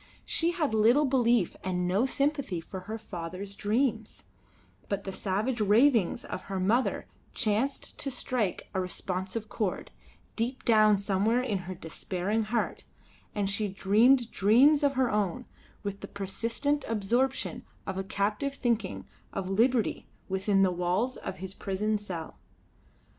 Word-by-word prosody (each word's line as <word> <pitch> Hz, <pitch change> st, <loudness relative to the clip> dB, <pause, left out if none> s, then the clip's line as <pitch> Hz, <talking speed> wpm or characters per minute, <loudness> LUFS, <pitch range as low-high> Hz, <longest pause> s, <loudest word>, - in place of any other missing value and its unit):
She 335 Hz, -, +2 dB
had 310 Hz, -9 st, 0 dB
little 235 Hz, +7 st, +5 dB
belief 240 Hz, -7 st, +2 dB
and 180 Hz, -1 st, -1 dB
no 200 Hz, +8 st, +2 dB
sympathy 275 Hz, -, 0 dB
for 185 Hz, +3 st, -7 dB
her 220 Hz, -, -2 dB
father's 185 Hz, -1 st, -6 dB
dreams; 220 Hz, +2 st, -1 dB, 0.7 s
but 200 Hz, -1 st, -1 dB
the 195 Hz, -, -4 dB
savage 215 Hz, +6 st, -1 dB
ravings 220 Hz, 0 st, +4 dB
of -, -, -5 dB
her 195 Hz, -1 st, -3 dB
mother 225 Hz, +8 st, +1 dB, 0.3 s
chanced 230 Hz, +5 st, -1 dB
to 280 Hz, -, -1 dB
strike 245 Hz, -6 st, -1 dB
a 190 Hz, -, 0 dB
responsive 185 Hz, +4 st, -3 dB
chord, 210 Hz, -4 st, -3 dB, 0.4 s
deep 240 Hz, +3 st, -2 dB
down 215 Hz, -2 st, +5 dB
somewhere 200 Hz, +5 st, +1 dB
in 210 Hz, -6 st, -1 dB
her 185 Hz, -, -4 dB
despairing 185 Hz, +5 st, -2 dB
heart; 230 Hz, +2 st, -1 dB, 0.5 s
and 205 Hz, -2 st, 0 dB
she 205 Hz, +2 st, 0 dB
dreamed 220 Hz, +6 st, +3 dB
dreams 260 Hz, +9 st, +5 dB
of 285 Hz, -1 st, +3 dB
her 260 Hz, -2 st, +1 dB
own 210 Hz, +3 st, -1 dB, 0.4 s
with 200 Hz, -1 st, -4 dB
the 200 Hz, -, -7 dB
persistent 230 Hz, +9 st, -1 dB
absorption 235 Hz, +5 st, 0 dB, 0.2 s
of 190 Hz, -1 st, -3 dB
a -, -, -1 dB
captive 210 Hz, +8 st, -1 dB
thinking 220 Hz, -, -1 dB, 0.3 s
of 195 Hz, -1 st, -3 dB
liberty 230 Hz, +3 st, +2 dB, 0.2 s
within 195 Hz, +1 st, +2 dB
the 185 Hz, -, +3 dB
walls 180 Hz, +8 st, 0 dB
of 190 Hz, -, -6 dB
his 190 Hz, 0 st, -7 dB
prison 210 Hz, +2 st, -1 dB
cell. 175 Hz, -6 st, -7 dB
210 Hz, 140 wpm, -29 LUFS, 190-245 Hz, 0.7 s, little